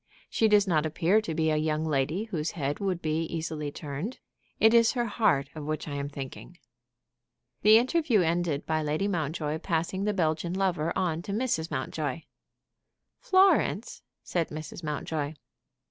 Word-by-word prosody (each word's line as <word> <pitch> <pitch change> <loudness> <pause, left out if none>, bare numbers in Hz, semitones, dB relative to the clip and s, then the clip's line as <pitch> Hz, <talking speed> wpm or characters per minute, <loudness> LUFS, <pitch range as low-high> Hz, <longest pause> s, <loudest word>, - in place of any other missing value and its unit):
She 225 - +3
does 210 -1 +5
not 155 -4 +2
appear 170 +6 +2
to 165 -7 -4
be 160 0 +2
a 155 - +2
young 155 0 0
lady 155 +6 0
whose 170 -8 -3
head 145 -1 -2
would 185 -4 -2
easily 160 -1 -2
be - - -4
turned. 150 - -5 0.4
It 220 +1 +6
is 230 -1 +5
her 240 -2 0
heart 195 -11 +1
of 155 - -7
which 155 +1 -3
I 145 - -4
am 140 0 -3
thinking." 140 +5 -8 1.0
The 215 +2 +8
interview 255 - +2
ended 165 -3 0
by 155 0 0
Lady 155 +6 0
Mountjoy 155 -4 -2
passing 175 +3 -1
the 210 - +1
Belgian 165 0 0
lover 180 -5 0
on 170 -4 0
to 200 - -6
Mrs. 210 -8 -1
Mountjoy. 145 +2 -3 1.0
"Florence!" 380 +1 +3 0.2
said 170 -3 -1
Mrs. 155 +2 -7
Mountjoy. 150 0 -3
160 Hz, 160 wpm, -28 LUFS, 155-195 Hz, 1.0 s, The